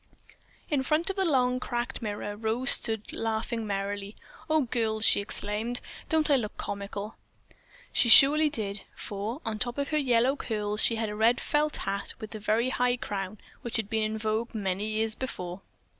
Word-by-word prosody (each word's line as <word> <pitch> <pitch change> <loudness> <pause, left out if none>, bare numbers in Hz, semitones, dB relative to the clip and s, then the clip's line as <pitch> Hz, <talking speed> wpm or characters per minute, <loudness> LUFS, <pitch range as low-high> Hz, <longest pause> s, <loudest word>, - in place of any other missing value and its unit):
In 290 -4 0
front 305 +7 +1
of - - -8
the 385 -1 0
long, 255 -5 +2
cracked 240 -1 -4
mirror 205 -1 -4
Rose 225 +5 +3
stood 220 -2 +6
laughing 225 0 -3
merrily. 200 +1 -4 0.3
"Oh, 310 0 +3
girls," 225 -3 -1
she - - +4
exclaimed, 210 +4 -3 0.3
"don't 315 -2 +3
I 280 - +6
look 215 -4 -5
comical?" 200 +1 -6 0.8
She 235 - +3
surely 300 +6 +8
did, 200 -6 -1
for, 215 +8 -5
on 220 -1 -3
top 240 +1 -2
of 280 0 -2
her 305 - +1
yellow 255 -1 +2
curls, 210 -5 -2
she 230 - +3
had 220 -1 -2
a 210 - -5
red 225 +3 +3
felt 300 0 0
hat 200 +1 -3
with 220 - -8
the 215 - -7
very 220 +4 +1
high 250 -1 +1
crown 200 -2 -5 0.2
which 235 - -2
had 220 -1 -4
been 220 0 +1
in 215 0 -1
vogue 220 +2 -2
many 200 0 -2
years 220 0 -1
before. 185 -7 -6
225 Hz, 180 wpm, -28 LUFS, 210-250 Hz, 0.8 s, surely